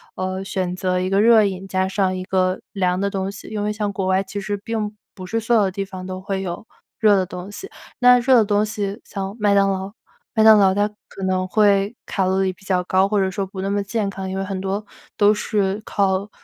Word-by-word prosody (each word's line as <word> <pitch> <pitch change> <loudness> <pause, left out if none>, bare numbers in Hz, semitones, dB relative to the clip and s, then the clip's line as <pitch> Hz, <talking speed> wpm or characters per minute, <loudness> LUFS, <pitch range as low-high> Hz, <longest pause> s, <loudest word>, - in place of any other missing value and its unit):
呃， 185 +1 -3
选 185 -2 -2
择 185 0 0
一 185 +1 -1
个 195 +1 +3
热 225 -1 +6
饮 190 -1 -3
加 190 0 0
上 190 -1 0
一 185 - -4
个 185 0 +1
凉 180 -2 0
的 200 +1 0
东 195 0 -3
西。 200 - -11
因 210 -1 -3
为 210 - 0
像 210 -1 -2
国 190 -1 -2
外， 190 0 +3
其 195 +1 -6
实 205 +1 -3
并 215 0 -3 0.2
不 185 - -8
是 225 +5 -1
所 225 +1 +1
有 215 - +5
的 190 - 0
地 195 +1 -3
方 185 -1 -8
都 185 0 -5
会 195 0 -3
有 180 +2 -5 0.3
热 210 -2 +5
的 190 -1 +1
东 180 +1 -8
西。 390 - -8 0.3
那 250 0 +7
热 255 +2 +4
的 230 - +6
东 205 0 +2
西 205 0 -4
像 195 0 -5
麦 205 -1 +3
当 195 0 +4
劳， 190 0 -4 0.4
麦 220 - +4
当 220 -1 +8
劳 195 -2 +5
它 205 +1 +2 0.2
可 195 - -9
能 185 0 0
会 200 +2 +2
卡 190 - -1
路 190 +1 +1
里 190 -1 0
比 185 - -23
较 185 -2 +1
高， 190 +2 +2
或 210 -1 +1
者 190 -1 +1
说 195 +1 -2
不 190 0 -7
那 195 - -2
么 205 0 0
健 205 +1 -2
康， 190 -1 -5
因 190 - -4
为 195 - -1
很 190 -1 -4
多 195 +2 -3 0.3
都 205 0 +5
是 205 -1 -1
靠， 195 0 0
195 Hz, 270 characters per minute, -21 LUFS, 190-210 Hz, 0.4 s, 当